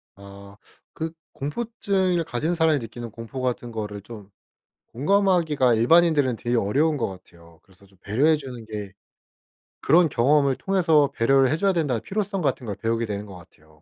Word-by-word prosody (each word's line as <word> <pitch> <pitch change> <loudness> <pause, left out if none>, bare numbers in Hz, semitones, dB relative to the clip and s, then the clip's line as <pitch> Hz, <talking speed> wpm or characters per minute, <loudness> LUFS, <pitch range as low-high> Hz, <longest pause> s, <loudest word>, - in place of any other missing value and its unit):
아 100 +1 -13 0.4
그 160 0 -4 0.2
공포증을 190 +2 -1
가진 155 +7 -2
사람이 160 -3 +2
느끼는 115 0 -8
공포 115 +4 -8
같은 120 -1 -2
거를 105 -2 -5
좀 105 -2 -12 0.6
공감하기가 160 - +2
일반인들은 145 0 +3
되게 120 +1 -2
어려운 140 +9 +1
것 115 - -1
같아요. 85 -3 -15
그래서 95 +1 -22
좀 95 -1 -25
배려해 145 +10 +2
주는 125 -5 -9
게, 105 -3 -7 0.9
그런 165 +2 +4
경험을 140 +2 +2
통해서 165 -7 +2
배려를 135 +2 +3
해 - - +2
줘야 195 +2 +2
된다는 145 - -1
필요성 200 -1 -3
같은 135 -4 -1
걸 105 - -4
배우게 115 +2 -1
되는 105 -1 -5
것 95 - -11
같아요. 80 -2 -19
130 Hz, 355 characters per minute, -24 LUFS, 105-160 Hz, 0.9 s, 그런